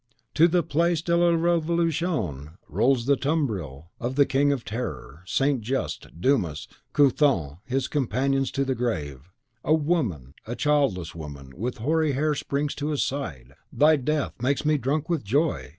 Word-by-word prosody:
To 165 +2 +6
the 175 0 +2
Place 165 +1 +1
de 170 0 +1
la 175 0 +4
Revolution 165 - 0
rolls 115 - +2
the 140 +1 +4
tumbril 100 - -2
of 125 +2 -3
the 140 0 +5
King 140 +2 +2
of 135 -4 -2
Terror, 85 - -5
St. 135 +3 +1
Just, 100 - -4
Dumas, 90 - 0 0.2
Couthon, 130 - +2
his 130 +1 -1
companions 135 -1 0
to 140 0 0
the 135 - 0
grave! 80 - -3 0.3
A 155 - +4
woman 125 - -1
a 120 - -3
childless 135 - +1
woman, 70 -5 -9
with 120 +7 -3
hoary 155 +5 +1
hair 150 +3 +1
springs 145 0 -2
to 145 - -4
his 150 -2 0
side, 70 - -5 0.2
"Thy 155 +1 +5
death 150 +1 -1
makes 140 +4 0
me 150 -1 +3
drunk 145 +5 -1
with 170 -4 -1
joy!" 110 - 0
135 Hz, 160 wpm, -25 LUFS, 90-150 Hz, 0.3 s, To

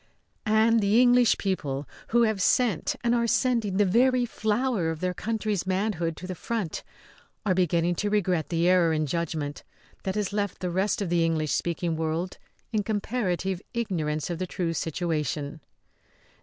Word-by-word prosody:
And 220 +1 +4
the 210 +2 +3
English 245 -1 +5
people, 145 -8 -2 0.2
who 235 +1 +3
have 220 -4 +1
sent 215 -4 +2
and 235 0 +2
are 235 -1 +2
sending 230 -6 +1
the 205 - +4
very 250 +5 +3
flower 220 -4 0
of 160 -1 -3
their 180 +1 -1
country's 215 -2 -2
manhood 185 -4 -1
to 180 - -8
the 185 - -4
front, 200 -1 -3 0.6
are 195 - +3
beginning 175 -1 +2
to 210 - 0
regret 185 -6 +1
the 170 0 +1
error 180 -3 +4
in 155 0 +1
judgment 150 -1 -3 0.4
that 190 0 -3
has 210 -1 -1
left 205 -2 -2
the 180 -1 -2
rest 200 +4 0
of 185 - -3
the 170 -1 +2
English 160 -2 0
speaking 170 -1 -1
world 160 +3 -2 0.3
in 215 - +2
comparative 195 -4 -1
ignorance 165 -9 -1
of 170 - -4
the 185 - -2
true 170 -1 -2
situation. 155 -2 -2
185 Hz, 165 wpm, -27 LUFS, 165-215 Hz, 0.6 s, English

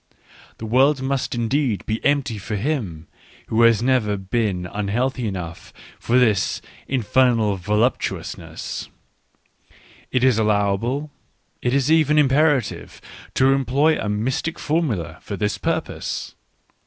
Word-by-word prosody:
The 110 - -7
world 135 +5 +3
must 135 -1 -1
indeed 120 -1 0
be 110 0 -3
empty 140 -6 +1
for 105 +2 -4
him 100 - -2 0.4
who 115 +1 +2
has 115 -1 +5
never 120 -6 +2
been 95 -2 -1
un 100 +3 -4
healthy 125 +3 -1
enough 85 -4 -6 0.3
for 120 - +1
this 110 -6 +2 0.2
" - - -24
infernal 115 -3 +2
voluptuousness 105 +6 -2 0.6
": - - -28
it 125 - +1
is 130 -4 +4
allowable, 110 +7 0 0.5
it 125 +2 +1
is 140 +2 +2
even 155 -2 +4
imperative, 145 -2 +2 0.4
to 135 +1 +4
employ 140 +4 +2
a 105 - -2
mystic 125 +10 -1
formula 110 - -1
for 100 - -6
this 105 +2 -1
purpose. 160 -1 -3
120 Hz, 130 wpm, -22 LUFS, 105-135 Hz, 0.6 s, has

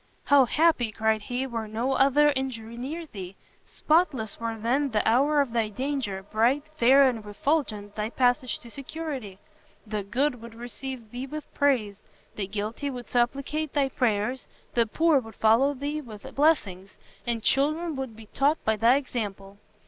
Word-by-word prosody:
"How 285 -2 +6
happy," 295 -4 +2
cried 220 0 +1
he, 245 +5 -3
"were 230 -4 -4
no 230 +5 -1
other 285 +2 +4
injury 235 -4 -4
near 295 +8 -5
thee! 190 - -9 0.3
spotless 300 - +1
were 230 -1 -3
then 255 +6 +1
the 215 -4 0
hour 285 +6 +4
of 275 -4 -2
thy 225 -2 +1
danger, 245 -5 -3
bright, 230 +8 +1
fair 270 +1 +6
and 230 -4 -2
refulgent 210 -3 -1
thy 210 +1 -2
passage 245 0 +1
to 235 - -12
security! 275 -8 -6 0.5
the 210 -1 -3
Good 245 +5 -1
would 230 -1 -10
receive 240 0 -7
thee 250 +2 -5
with 305 +1 -8
praise, 230 -8 +1 0.3
the 200 -2 -3
Guilty 215 +8 -3
would 250 -3 -7
supplicate 275 +5 0
thy 280 -2 +2
prayers, 240 0 0 0.3
the 235 -2 +2
Poor 315 +5 +3
would 225 -3 -11
follow 235 +6 +4
thee 290 +3 -3
with 215 -7 -11
blessings, 205 - +1 0.3
and 230 -2 -1
Children 310 +6 +1
would 265 -4 -5
be 220 0 -12
taught 285 +8 +1
by 220 0 +2
thy 230 +4 +5
example!" 205 -7 -4
245 Hz, 165 wpm, -27 LUFS, 220-280 Hz, 0.5 s, How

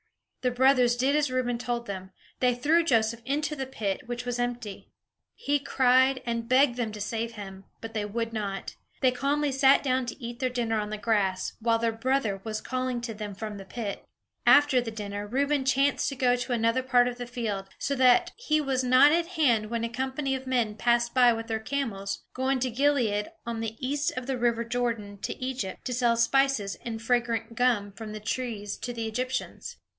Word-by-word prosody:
The 255 - +2
brothers 250 -1 +4
did 265 +4 +2
as 300 -2 +2
Reuben 250 -2 -1
told 240 -1 -2
them; 190 -2 -6 0.3
they 250 -1 +3
threw 310 +7 +3
Joseph 230 -5 +1
into 295 +4 -1
the 265 -2 -4
pit, 205 -7 -3
which 240 0 -4
was 245 0 -2
empty. 245 -4 -4 0.5
He 290 0 0
cried, 260 -1 +3
and 230 -1 -3
begged 255 -1 +4
them 230 -3 -1
to 210 - -7
save 225 +2 -3
him; 195 -3 -9
but 225 0 -8
they 210 -2 -1
would 230 +2 -3
not. 200 -3 -4 0.3
They 255 - +4
calmly 280 +3 0
sat 270 +1 +5
down 260 -2 0
to 235 - -6
eat 235 -1 -7
their 255 -1 +1
dinner 230 -3 -1
on 210 0 -3
the 215 - -4
grass, 205 -3 0
while 230 0 +2
their 230 0 0
brother 225 -4 -1
was 215 -1 -3
calling 255 0 -2
to 235 -1 -4
them 210 -2 -6
from 210 0 -6
the 195 - -9
pit. 205 0 -5 0.4
After 290 -3 +6
the 235 - -4
dinner, 205 -2 -5
Reuben 280 +4 +1
chanced 275 +1 +2
to 275 - -5
go 250 -1 +3
to 245 0 -3
another 230 +2 +2
part 250 -1 +3
of 245 0 -5
the 245 - -5
field; 215 -6 -4
so 280 - -1
that 265 +7 +4
he 310 -11 +1
was 270 -3 0
not 255 +3 +6
at 335 +1 +2
hand 250 - +2
when 230 0 -2
a 230 - -1
company 265 +3 -2
of 265 0 -4
men 240 -5 +1
passed 235 +1 +1
by 250 -2 +6
with 225 0 -3
their 225 -1 -2
camels, 220 -6 -3
going 260 +1 0
from 250 -1 -1
Gilead, 240 -6 +1
on 230 -1 -3
the 225 0 -4
east 285 +2 -1
of 255 - -3
the 265 -1 -2
river 235 -1 +1
Jordan, 230 -4 -2
to - - -4
Egypt, 255 -7 -4
to 250 - -2
sell 240 -1 +2
spices 235 -4 +2
and 225 -2 -4
fragrant 230 -1 0
gum 230 -4 +1
from 215 +1 -7
trees 215 -3 -3
to 245 - -5
the 230 -2 -4
Egyptians. 255 +4 -4
240 Hz, 205 wpm, -27 LUFS, 225-260 Hz, 0.5 s, After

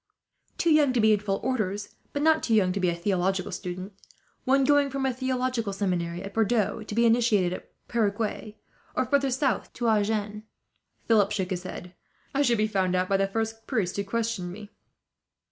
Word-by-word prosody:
"Too 335 - +2
young 295 -4 +4
to 245 - +1
be 220 0 +5
in 210 - +2
full 195 -1 -2
orders, 210 -5 -2 0.2
but 285 - -2
not 315 0 +4
too 225 - +1
young 190 -4 +3
to 200 - -2
be 180 -2 +2
a 170 - -1
theological 185 +1 0
student: 185 +2 -6 0.5
one 270 +1 +4
going 290 0 +4
from 270 0 -2
a 265 - +1
theological 255 -3 -1
seminary, 180 -3 -2
at 195 0 -7
Bordeaux, 225 0 +1
to 215 -1 -7
be 235 +1 +4
initiated 225 -6 +3
at - - -9 0.2
Perigueux, 215 -1 -1 0.4
or - - +1
further 280 -1 +2
south 265 +1 0
to 240 -2 0
Agen." 210 -1 0 0.7
Philip 210 -3 +4
shook 195 -2 -2
his 180 -1 -2
head. 180 -1 -8 0.4
"I 280 - +2
should 240 -4 +3
be 215 - +2
found 190 -4 0
out 185 0 0
by 195 - +3
the 195 0 +1
first 225 +2 -3
priest 205 -9 -1
who 200 - -1
questioned 220 -3 -2
me." 205 +2 -10
215 Hz, 195 wpm, -27 LUFS, 195-245 Hz, 0.7 s, be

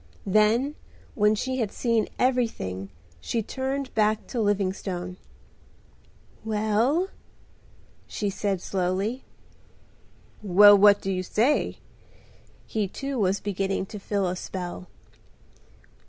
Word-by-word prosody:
Then 215 +8 +3 0.4
when 210 0 +3
she 260 +4 -2
had 220 -4 -1
seen 230 -3 0
everything 225 - -1 0.3
she 225 - -2
turned 265 +3 -3
back 215 0 +1
to 240 - -2
Livingstone. 190 -3 -2 1.3
"Well!" 220 - +1 1.0
she 210 - -3
said 195 -2 -2
slowly. 195 +7 -2 1.2
"Well, 205 +1 +8
what 200 0 +6
do 195 - -2
you 185 -1 -1
say?" 235 +10 +1 0.9
He 215 -3 -1
too 275 +6 -4
was 195 -1 +1
beginning 195 -1 -2
to 210 - -5
feel 200 0 -1
a 180 - -2
spell. 180 -1 -6
210 Hz, 105 wpm, -26 LUFS, 190-230 Hz, 1.3 s, Well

